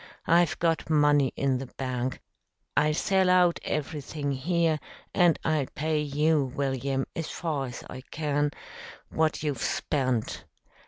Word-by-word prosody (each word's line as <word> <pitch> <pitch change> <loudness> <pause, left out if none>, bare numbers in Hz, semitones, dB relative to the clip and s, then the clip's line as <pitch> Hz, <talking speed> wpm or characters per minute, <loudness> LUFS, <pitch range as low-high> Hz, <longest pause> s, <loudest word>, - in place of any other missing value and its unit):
I've 170 -1 +4
got 165 -1 0
money 145 -3 +4
in 135 -2 +1
the 135 - -6
bank, 130 -1 -2 0.5
I'll 150 0 +3
sell 190 +2 +2
out 180 -1 +4
everything 150 -1 -3
here, 160 +3 +1 0.3
and 175 -3 +4
I'll 155 -4 +1
pay 155 +1 0
you, 150 0 +2
William, 135 -1 -1
as 165 - -3
far 150 -6 -2
as 120 - -8
I 130 - -8
can, 145 -1 0 0.6
what 160 -1 0
you've 145 -6 -2
spent. 130 0 -1
150 Hz, 130 wpm, -28 LUFS, 135-160 Hz, 0.6 s, I've